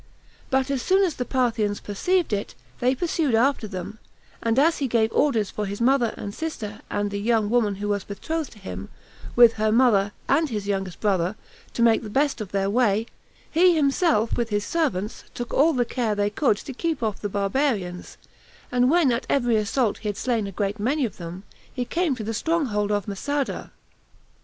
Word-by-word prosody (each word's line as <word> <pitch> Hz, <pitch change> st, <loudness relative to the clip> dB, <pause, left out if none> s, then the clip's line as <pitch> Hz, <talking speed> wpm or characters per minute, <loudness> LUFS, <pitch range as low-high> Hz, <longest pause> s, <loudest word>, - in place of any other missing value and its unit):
But 265 Hz, +1 st, +1 dB
as 270 Hz, -2 st, 0 dB
soon 380 Hz, +6 st, +3 dB
as 355 Hz, -5 st, +1 dB
the 250 Hz, -, -4 dB
Parthians 230 Hz, -6 st, 0 dB
perceived 345 Hz, -, 0 dB
it, 200 Hz, 0 st, -3 dB, 0.2 s
they 255 Hz, +2 st, +2 dB
pursued 310 Hz, -4 st, 0 dB
after 240 Hz, -1 st, +2 dB
them; 195 Hz, +2 st, -7 dB, 0.4 s
and 230 Hz, +1 st, 0 dB
as 320 Hz, +4 st, +4 dB
he 275 Hz, -, 0 dB
gave 225 Hz, -2 st, +1 dB
orders 230 Hz, -9 st, +2 dB
for 210 Hz, -1 st, -3 dB
his 200 Hz, +1 st, -5 dB
mother, 245 Hz, -1 st, +2 dB
and 200 Hz, -, -6 dB
sister, 220 Hz, -10 st, -5 dB
and 205 Hz, 0 st, -1 dB
the 200 Hz, -, -3 dB
young 220 Hz, -1 st, +1 dB
woman 225 Hz, -5 st, +2 dB
who 205 Hz, +2 st, -4 dB
was 200 Hz, -1 st, 0 dB
betrothed 315 Hz, +10 st, -4 dB
to -, -, -17 dB
him, 95 Hz, -, -7 dB, 0.5 s
with 240 Hz, -1 st, +8 dB
her 215 Hz, 0 st, +3 dB
mother, 215 Hz, -4 st, +4 dB, 0.2 s
and 305 Hz, +2 st, +2 dB
his 210 Hz, -4 st, -3 dB
youngest 195 Hz, -3 st, -2 dB
brother, 190 Hz, -2 st, +1 dB, 0.4 s
to 235 Hz, -, +2 dB
make 230 Hz, -1 st, +4 dB
the 215 Hz, -, -7 dB
best 270 Hz, +1 st, +1 dB
of 205 Hz, -, -6 dB
their 195 Hz, -1 st, 0 dB
way, 215 Hz, -1 st, +2 dB, 0.5 s
he 350 Hz, +1 st, +5 dB
himself, 280 Hz, -, +2 dB
with 235 Hz, -1 st, -1 dB
his 205 Hz, -1 st, -1 dB
servants, 235 Hz, -, -2 dB
took 240 Hz, -1 st, -5 dB
all 310 Hz, +4 st, +5 dB
the 250 Hz, -5 st, +1 dB
care 230 Hz, -3 st, -1 dB
they 205 Hz, 0 st, 0 dB
could 215 Hz, -2 st, +2 dB
to 270 Hz, -, -8 dB
keep 320 Hz, -1 st, -2 dB
off 215 Hz, -2 st, -2 dB
the 205 Hz, -, -2 dB
barbarians; 200 Hz, -3 st, -1 dB, 0.5 s
and 250 Hz, 0 st, +3 dB
when 320 Hz, -4 st, +4 dB
at 235 Hz, -, -2 dB
every 240 Hz, -4 st, +2 dB
assault 215 Hz, +1 st, 0 dB
he 215 Hz, -, -3 dB
had 205 Hz, -, -4 dB
slain 230 Hz, -5 st, 0 dB
a -, -, -6 dB
great 200 Hz, +2 st, -2 dB
many 265 Hz, +6 st, +1 dB
of 220 Hz, -, -6 dB
them, 175 Hz, +2 st, -7 dB, 0.3 s
he 250 Hz, -2 st, -3 dB
came 335 Hz, -1 st, 0 dB
to 230 Hz, -, -6 dB
the 225 Hz, +2 st, -3 dB
strong 325 Hz, +8 st, 0 dB
hold 210 Hz, -3 st, -1 dB
of 205 Hz, -1 st, -1 dB
Masada. 280 Hz, +8 st, -3 dB
230 Hz, 200 wpm, -24 LUFS, 205-270 Hz, 0.5 s, with